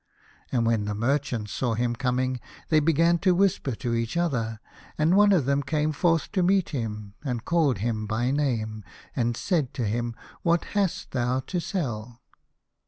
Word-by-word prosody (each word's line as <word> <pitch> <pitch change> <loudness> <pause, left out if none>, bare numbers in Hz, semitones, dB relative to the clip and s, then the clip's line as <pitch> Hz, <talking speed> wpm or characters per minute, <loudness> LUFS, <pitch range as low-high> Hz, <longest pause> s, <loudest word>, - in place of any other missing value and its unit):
And 120 -3 +1
when 115 -3 +1
the 105 0 -2
merchants 120 -2 -1
saw 120 -3 -1
him 120 +1 0
coming, 130 0 0 0.3
they 155 - +5
began 165 +3 +3
to 185 0 +3
whisper 180 - +1
to 120 +1 -2
each 115 +6 -1
other, 115 -10 -1 0.4
and 160 +4 +3
one 205 0 +6
of 175 -9 +3
them 140 +1 +2
came 150 +2 0
forth 165 +1 +1
to 190 - +1
meet 190 0 +3
him, 105 -6 -4
and 125 -5 -3
called 160 - +2
him 110 +1 -2
by 120 +4 0
name, 115 -7 -1 0.3
and 120 -2 0
said 160 -9 0
to 120 - -1
him, 115 +2 -2
" - - -23
What 170 0 +2
hast 200 -4 0
thou 125 0 0
to 175 +7 -3
sell 120 - -4
130 Hz, 175 wpm, -26 LUFS, 115-165 Hz, 0.4 s, one